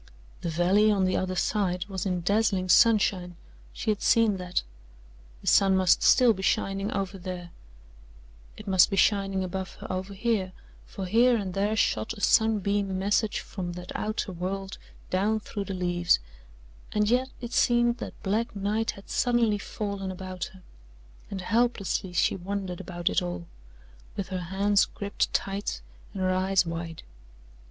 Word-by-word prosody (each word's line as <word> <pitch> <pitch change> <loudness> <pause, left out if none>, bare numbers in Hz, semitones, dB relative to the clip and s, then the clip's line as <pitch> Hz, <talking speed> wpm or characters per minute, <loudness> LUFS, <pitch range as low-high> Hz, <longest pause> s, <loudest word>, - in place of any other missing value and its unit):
The 170 - -2
valley 185 +6 +3
on 200 -3 +2
the 185 - +1
other 185 0 -1
side 180 -2 0
was 195 -2 -4
in 180 -2 -1
dazzling 195 -1 +1
sunshine 190 -4 +4 0.4
she 215 - -1
had 210 - -3
seen 225 -4 +3
that. 180 -1 -2 0.8
The - - -15
sun 195 -1 +5
must 185 -2 +4
still 245 -3 +6
be 190 - -7
shining 195 +1 0
over 195 0 -3
there 175 -1 -6 1.1
it 215 - -11
must 190 -2 +5
be - - -1
shining 195 -1 +2
above 190 +1 -4
her - - -6
over 190 +2 -4
here, 195 -3 -1 0.3
for 195 - -6
here 235 +5 +4
and 195 -4 -4
there 205 +3 0
shot 220 0 0
a 205 - -11
sunbeam 205 -3 +2
message 205 +2 +1
from 180 -3 -6
that 180 0 -8
outer 215 -1 -2
world 190 +2 -4 0.3
down 205 +4 +1
through 205 -1 -5
the 195 - -4
leaves, 175 -1 +2 0.7
and 210 0 +1
yet 250 +3 +2
it 240 -1 -7
seemed 240 0 +3
that - - -8
black 215 +3 -1
night 210 +3 -1
had 200 - -13
suddenly 235 -4 +2
fallen 200 -1 -4
about 185 -1 -5
her, 190 -1 -14 0.7
and 195 -2 -5
helplessly 225 -3 0
she 175 - +2
wondered 190 -1 -4
about 175 -1 -6
it - - +3
all, 90 -1 -4 0.7
with 195 -2 -3
her 185 -2 -3
hands 200 +1 +3
gripped 200 0 -3
tight 195 - -2 0.3
and 190 - -4
her 185 - +2
eyes 185 0 +2
wide. 165 -1 -5
195 Hz, 160 wpm, -27 LUFS, 185-210 Hz, 1.1 s, still